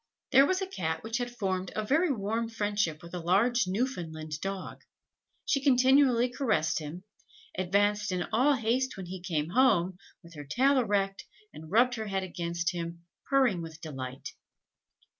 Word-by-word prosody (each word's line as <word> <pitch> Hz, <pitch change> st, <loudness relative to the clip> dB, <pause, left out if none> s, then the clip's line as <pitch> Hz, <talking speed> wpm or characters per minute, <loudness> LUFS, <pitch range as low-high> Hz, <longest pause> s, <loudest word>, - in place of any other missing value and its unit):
_] -, -, -55 dB, 0.3 s
There 275 Hz, +1 st, +7 dB
was 375 Hz, +1 st, 0 dB
a -, -, -4 dB
Cat 160 Hz, -, -3 dB
which 225 Hz, +2 st, -2 dB
had 245 Hz, 0 st, -2 dB
formed 190 Hz, -6 st, -3 dB
a 215 Hz, -, -2 dB
very 315 Hz, +8 st, +2 dB
warm 225 Hz, 0 st, -2 dB
friendship 205 Hz, -8 st, -1 dB
with 170 Hz, -, -11 dB
a 180 Hz, -, -3 dB
large 210 Hz, +7 st, +2 dB
Newfoundland 165 Hz, -, -3 dB
dog: 195 Hz, -1 st, -5 dB, 0.6 s
she 275 Hz, -, +1 dB
continually 260 Hz, -2 st, +4 dB
caressed 225 Hz, -, 0 dB
him 160 Hz, +4 st, -7 dB, 0.5 s
advanced 205 Hz, +3 st, +1 dB
in 180 Hz, -1 st, -1 dB
all 270 Hz, +6 st, +4 dB
haste 255 Hz, +2 st, 0 dB
when 190 Hz, -, -6 dB
he 180 Hz, +1 st, -7 dB
came 165 Hz, -4 st, -2 dB
home, 190 Hz, -6 st, +3 dB, 0.2 s
with 170 Hz, 0 st, -14 dB
her 145 Hz, -2 st, -8 dB
tail 260 Hz, -, +3 dB
erect, 200 Hz, -4 st, 0 dB, 0.3 s
and 155 Hz, +1 st, -11 dB
rubbed 240 Hz, +6 st, +4 dB
her 220 Hz, -1 st, -4 dB
head 195 Hz, -1 st, -1 dB
against 170 Hz, -1 st, -2 dB
him, 170 Hz, -1 st, -6 dB, 0.2 s
purring 260 Hz, -10 st, +3 dB
with 160 Hz, -1 st, -9 dB
delight. 135 Hz, -4 st, -7 dB
200 Hz, 165 wpm, -29 LUFS, 170-245 Hz, 0.6 s, There